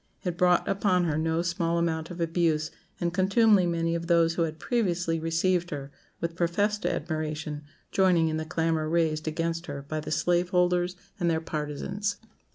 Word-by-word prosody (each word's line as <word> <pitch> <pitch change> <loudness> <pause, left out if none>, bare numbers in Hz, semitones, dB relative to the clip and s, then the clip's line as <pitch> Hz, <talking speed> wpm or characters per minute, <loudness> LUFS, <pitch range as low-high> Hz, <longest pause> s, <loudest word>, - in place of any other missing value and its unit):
It 180 -3 -2
brought 180 0 +3
upon 190 -2 +2
her 160 -3 0
no 160 +2 0
small 170 -1 0
amount 160 -1 -1
of 175 -1 -8
abuse 165 -2 +1 0.3
and 170 0 -1
contumely, 195 0 +4
many 165 -1 0
of 170 0 -3
those 165 -1 +4
who 170 - -1
had 160 -1 -1
previously 175 -7 0
received 170 +2 +1
her 140 -2 -6 0.3
with 170 0 -3
professed 205 +5 0
admiration 155 -1 -3 0.3
joining 180 -4 +3
in 155 0 -1
the 160 - -2
clamour 160 -1 0
raised 160 -2 +1
against 165 +2 -2
her 140 -1 -5
by 155 +2 -4
the 155 - -6
slave 175 +2 +1
holders 180 -1 +2 0.2
and 175 -2 +2
their 160 -1 +1
partisans. 160 +7 -3
170 Hz, 170 wpm, -27 LUFS, 160-180 Hz, 0.3 s, contumely